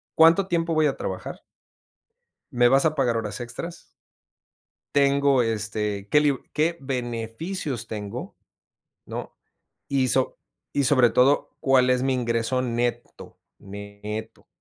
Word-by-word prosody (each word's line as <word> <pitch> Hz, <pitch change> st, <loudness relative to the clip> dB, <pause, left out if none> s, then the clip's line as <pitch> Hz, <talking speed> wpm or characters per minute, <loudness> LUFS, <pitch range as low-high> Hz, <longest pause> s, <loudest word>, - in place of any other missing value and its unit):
¿cuánto 165 Hz, +4 st, +6 dB
tiempo 170 Hz, -1 st, 0 dB
voy 155 Hz, -1 st, +3 dB
a 140 Hz, -, -2 dB
trabajar? -, -, -5 dB, 1.1 s
¿Me 120 Hz, -1 st, +4 dB
vas 135 Hz, +2 st, +4 dB
a 155 Hz, -, +2 dB
pagar 125 Hz, -5 st, +1 dB
horas 105 Hz, -1 st, -3 dB
extras? 120 Hz, +8 st, -7 dB, 1.1 s
¿Tengo, 140 Hz, -2 st, +4 dB
este 105 Hz, -2 st, -2 dB
qué 150 Hz, -, +5 dB
lib 145 Hz, -3 st, +2 dB
qué 160 Hz, +3 st, +1 dB
beneficios 125 Hz, -, -4 dB
tengo?, 105 Hz, -2 st, -6 dB, 0.7 s
¿no? -, -, -7 dB, 0.5 s
Y 135 Hz, -2 st, +1 dB
so 130 Hz, 0 st, +1 dB, 0.4 s
y 140 Hz, -, +1 dB
sobre 130 Hz, -3 st, +5 dB
todo, 135 Hz, +5 st, +3 dB
¿cuál 130 Hz, -2 st, +3 dB
es 125 Hz, 0 st, +3 dB
mi 135 Hz, 0 st, +1 dB
ingreso 120 Hz, 0 st, 0 dB
neto? 120 Hz, -1 st, -3 dB, 0.2 s
Neto. 100 Hz, +2 st, -8 dB
125 Hz, 125 wpm, -25 LUFS, 115-140 Hz, 1.1 s, cuánto